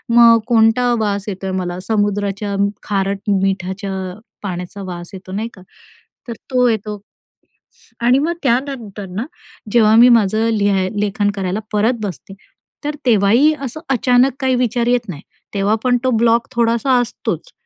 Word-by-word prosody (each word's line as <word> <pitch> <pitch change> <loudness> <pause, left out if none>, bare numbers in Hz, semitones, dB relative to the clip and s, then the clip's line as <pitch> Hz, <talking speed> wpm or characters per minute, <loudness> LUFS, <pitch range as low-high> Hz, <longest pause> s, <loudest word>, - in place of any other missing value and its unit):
मग 230 -1 +7
कोणता 240 +1 +3
वास 205 -2 -1
येतोय 190 -1 -4
मला? 180 -1 -3
समुद्राच्या 205 -1 -1 0.3
खारट 195 0 -2
मिठाच्या 195 +1 -2 0.5
पाण्याचा 180 0 -5
वास 175 -1 -7
येतो 185 -1 -10
नाही 210 +4 -3
का? 190 - -15 0.7
तर 235 - -4 0.2
तो 250 -1 +3
येतो 210 -2 -3 1.0
आणि 245 +3 +4
मग 325 +4 0
त्यानंतर 240 -6 -2
ना 220 +5 -2 0.5
जेव्हा 220 -2 +5
मी 240 +2 +8
माझं 220 -1 +3
लिहाय 195 -2 +1
लेखन 205 0 0
करायला 190 0 -2
परत 215 +4 +2
बसते, 195 0 -6 0.5
तर 295 +1 -3
तेव्हाही 235 +6 +4
असं 275 +2 -5
अचानक 255 +1 +3
काही 260 -2 +1
विचार 240 -1 0
येत 245 -3 +1
नाही, 150 -5 -7 0.3
तेव्हा 200 +1 +1
पण 250 -1 +3
तो 260 - +2
ब्लॉक 235 0 +3
थोडासा 235 +2 +2
असतोच. 245 - -4
220 Hz, 145 wpm, -18 LUFS, 195-245 Hz, 1.0 s, मी